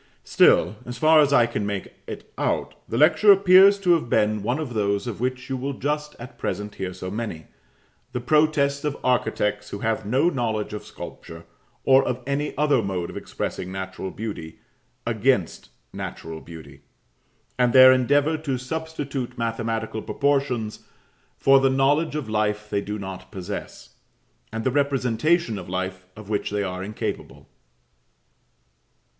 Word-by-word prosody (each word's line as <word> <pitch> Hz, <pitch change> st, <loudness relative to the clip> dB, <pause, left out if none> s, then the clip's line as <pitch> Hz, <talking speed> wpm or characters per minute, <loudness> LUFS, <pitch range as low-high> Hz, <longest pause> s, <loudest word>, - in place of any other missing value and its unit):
Still, -, -, +4 dB
as 125 Hz, +1 st, -7 dB
far 155 Hz, 0 st, +5 dB
as 145 Hz, -2 st, +4 dB
I 120 Hz, -4 st, +5 dB
can 115 Hz, -3 st, -3 dB
make 100 Hz, -1 st, -4 dB
it -, -, -9 dB
out, -, -, -1 dB, 0.2 s
the -, -, -2 dB
lecture 210 Hz, -1 st, +6 dB
appears 195 Hz, +1 st, +7 dB
to 180 Hz, -3 st, +3 dB
have 160 Hz, -8 st, 0 dB
been 105 Hz, -1 st, +2 dB
one 120 Hz, +6 st, -1 dB
of 150 Hz, -6 st, -4 dB
those 100 Hz, -1 st, 0 dB
of 120 Hz, -5 st, -5 dB
which 130 Hz, 0 st, -2 dB
you 135 Hz, -, -2 dB
will 135 Hz, +2 st, -3 dB
just 150 Hz, +2 st, -3 dB
at 120 Hz, +1 st, -11 dB
present 105 Hz, +2 st, -3 dB
hear 95 Hz, -1 st, -4 dB
so 90 Hz, 0 st, -7 dB
many, 105 Hz, -7 st, -5 dB, 0.7 s
the 125 Hz, -, -3 dB
protests 140 Hz, +1 st, +2 dB
of 150 Hz, -1 st, -2 dB
architects 105 Hz, -4 st, 0 dB
who -, -, -5 dB
have 110 Hz, 0 st, 0 dB
no 125 Hz, +10 st, +2 dB
knowledge 110 Hz, -6 st, -2 dB
of 105 Hz, -, -5 dB
sculpture 85 Hz, 0 st, -10 dB, 0.4 s
or 135 Hz, 0 st, +5 dB
of 125 Hz, 0 st, -3 dB
any 140 Hz, +2 st, -2 dB
other 145 Hz, -4 st, +3 dB
mode 95 Hz, -4 st, -3 dB
of -, -, -12 dB
expressing 90 Hz, -, -5 dB
natural 95 Hz, 0 st, -5 dB
beauty 95 Hz, -7 st, -7 dB, 0.5 s
against 115 Hz, -4 st, 0 dB, 0.2 s
natural 80 Hz, -1 st, -7 dB
beauty; 80 Hz, -2 st, -12 dB, 0.8 s
and 125 Hz, -1 st, +4 dB
their 130 Hz, +1 st, +9 dB
endeavour 145 Hz, +5 st, +2 dB
to 145 Hz, -4 st, -2 dB
substitute 140 Hz, -2 st, -5 dB
mathematical 115 Hz, -1 st, -2 dB
proportions 135 Hz, -7 st, -1 dB, 0.6 s
for 135 Hz, 0 st, +5 dB
the 135 Hz, 0 st, +3 dB
knowledge 145 Hz, +4 st, +2 dB
of 150 Hz, -5 st, -3 dB
life 105 Hz, -1 st, -1 dB
they 100 Hz, -, +1 dB
do 105 Hz, +1 st, -4 dB
not 95 Hz, -2 st, -8 dB
possess, 100 Hz, 0 st, -7 dB, 0.5 s
and 115 Hz, 0 st, -4 dB
the 130 Hz, -, +1 dB
representation 140 Hz, -, +1 dB
of 90 Hz, -, -9 dB
life 95 Hz, 0 st, -4 dB
of 105 Hz, -1 st, -11 dB
which 105 Hz, -1 st, -1 dB
they 105 Hz, 0 st, -1 dB
are 90 Hz, -1 st, -4 dB
incapable. 105 Hz, +2 st, -5 dB
120 Hz, 155 wpm, -24 LUFS, 105-140 Hz, 0.8 s, their